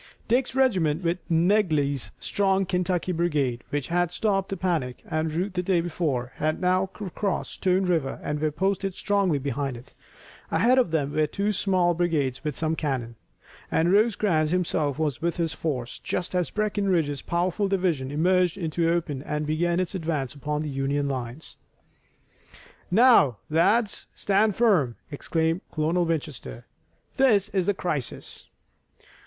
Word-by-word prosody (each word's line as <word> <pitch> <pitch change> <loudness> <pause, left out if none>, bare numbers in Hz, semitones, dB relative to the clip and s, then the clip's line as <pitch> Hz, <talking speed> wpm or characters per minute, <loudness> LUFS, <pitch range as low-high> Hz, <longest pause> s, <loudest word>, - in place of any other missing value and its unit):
Dick's 250 +1 +1
regiment 185 - +2
with 170 +1 0
Negley's 160 - +2
strong 195 -1 +1
Kentucky 180 0 -1
brigade, 150 -8 0
which 145 -2 -3
had 175 0 +1
stopped 195 0 0
the 195 - -3
panic 165 -9 -2
and 155 0 -1
rout 180 +5 -2
the 180 - 0
day 180 -1 +1
before, 155 -7 -2
had 155 +1 0
now 185 +1 +1
recrossed 200 0 -3
Stone 185 0 +1
River 160 -7 0
and 150 0 -2
were 155 - +2
posted 195 +4 -1
strongly 200 -6 +1
behind 140 -1 -3
it. 120 +3 -15 0.6
Ahead 255 +3 +4
of 245 - +2
them 145 -3 -1
were 155 -1 +2
two 205 +5 -1
small 185 -3 +2
brigades 160 -7 0
with 150 -3 -3
some 160 0 0
cannon, 130 -7 -2 0.6
and 170 +3 +2
Rosecrans 200 -7 +2
himself 155 -5 0
was 155 -3 -1
with 170 0 -1
this 165 -2 -1
force 125 -7 -4
just 180 - -3
as 180 -2 0
Breckinridge's 195 -9 0
powerful 180 +3 0
division 180 -9 0
emerged 180 +4 +2
into 170 -2 -2
the - - +3
open 160 -6 -1
and 150 +1 -3
began 170 +3 0
its 185 0 -1
advance 160 -7 -2
upon 150 +1 -3
the 150 - -4
Union 140 +1 -1
lines. 130 +2 -5 1.3
"Now, 190 - +5
lads, 205 +7 +2
stand 205 0 +2
firm!" 180 - +3 0.2
exclaimed 160 +4 -1
Colonel 165 +3 +1
Winchester. 150 - -4 0.5
"This 210 -7 +4
is 190 -4 -1
the 205 - +2
crisis." 150 -10 -4
170 Hz, 150 wpm, -26 LUFS, 150-190 Hz, 1.3 s, Now